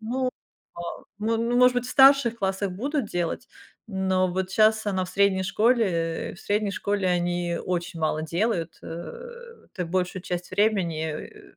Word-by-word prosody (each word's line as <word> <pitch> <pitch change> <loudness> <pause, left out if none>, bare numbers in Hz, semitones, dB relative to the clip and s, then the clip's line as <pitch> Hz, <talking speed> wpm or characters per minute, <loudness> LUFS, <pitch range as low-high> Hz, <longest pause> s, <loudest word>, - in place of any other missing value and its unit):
ну 245 +4 -2
во 255 - +1 0.9
ну 225 +2 0
ну 235 +1 0
может 250 0 +6
быть, 245 - +1
в - - -6
старших 270 -4 +6
классах 195 -1 -1
будут 270 - -2
делать, 175 -4 -3 0.4
но 190 -2 +1
вот 185 +1 -2
щас 215 +1 +3
она 190 -2 0
в - - -9
средней 195 -1 +2
школе, 225 +5 +3 0.5
э, - - -11
в - - -15
средней 205 0 0
школе 200 -1 -1
они 175 -1 -1
очень 175 -2 -3
мало 155 0 0
делают. 170 +1 -1
Э, 325 - -7 0.5
ты 180 - 0
большую 180 +1 -2
часть 180 -1 -4
времени, 200 -5 +2 0.3
э, - - -16
195 Hz, 165 wpm, -25 LUFS, 180-225 Hz, 0.9 s, может